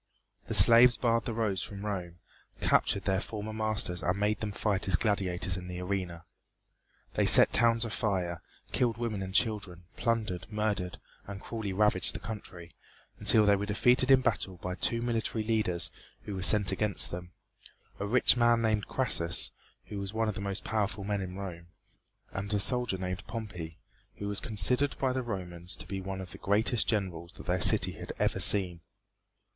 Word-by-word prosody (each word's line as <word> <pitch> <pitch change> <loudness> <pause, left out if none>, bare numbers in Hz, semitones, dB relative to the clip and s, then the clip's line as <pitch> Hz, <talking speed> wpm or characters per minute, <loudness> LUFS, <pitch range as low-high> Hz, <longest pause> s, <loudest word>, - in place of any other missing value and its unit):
The - - -2
slaves 120 +1 +7
barred 115 -1 0
the 120 - -3
roads 105 -5 -1
from 100 0 -5
Rome, 90 -5 -5 0.4
captured 100 - +1
their 95 0 0
former 110 0 -6
masters 110 -5 -2
and 90 +2 -1
made 105 +1 0
them 105 -1 -4
fight 100 -2 -1
as 95 - +3
gladiators 95 -3 -1
in 90 -1 -8
the 90 0 -6
arena. 90 -3 -4 0.9
They - - +1
set - - +8
towns 115 0 +3
afire, 95 -7 -2 0.3
killed 120 -3 0
women 115 -4 -3
and 95 0 -5
children, 100 -4 -1
plundered, 110 -7 -2
murdered 105 -4 -3 0.3
and 100 0 -7
cruelly 110 -2 -5
ravaged 105 +2 +2
the - - -4
country, 95 -6 -9 0.5
until 110 -1 +4
they 100 0 +4
were 100 +1 -4
defeated 125 +5 +2
in 135 -1 +6
battle 100 -6 -2
by 90 +1 -5
two 115 +5 -1
military 115 -2 -2
leaders 90 -7 0 0.3
who 105 - -7
were 95 - -5
sent 100 0 +6
against 100 +1 0
them 90 0 -8 0.7
a 100 - -3
rich 125 +4 +4
man 120 -1 +3
named 110 -2 0
Crassus, 85 -10 +1 0.3
who 100 - -7
was 100 +2 -6
one 110 0 0
of 110 - -1
the 95 - -7
most 100 0 -4
powerful 105 -2 -2
men 100 0 -2
in 90 -1 -7
Rome, 85 -4 -8 0.6
and 100 +2 -5
a - - +1
soldier 125 -2 +1
named 90 0 -5
Pompey, 90 -8 -7 0.4
who 100 - -6
was 100 -1 -1
considered 125 +6 +1
by 130 -2 0
the 130 - -2
Romans 90 -6 -5
to - - -10
be 95 -1 -5
one 95 0 -6
of 90 - -10
the - - -11
greatest 105 +3 +1
generals 95 -5 -3
that - - -13
their 90 0 -1
city - - +4
had - - -8
ever - - 0
seen. 90 -4 +6
100 Hz, 180 wpm, -29 LUFS, 90-110 Hz, 0.9 s, set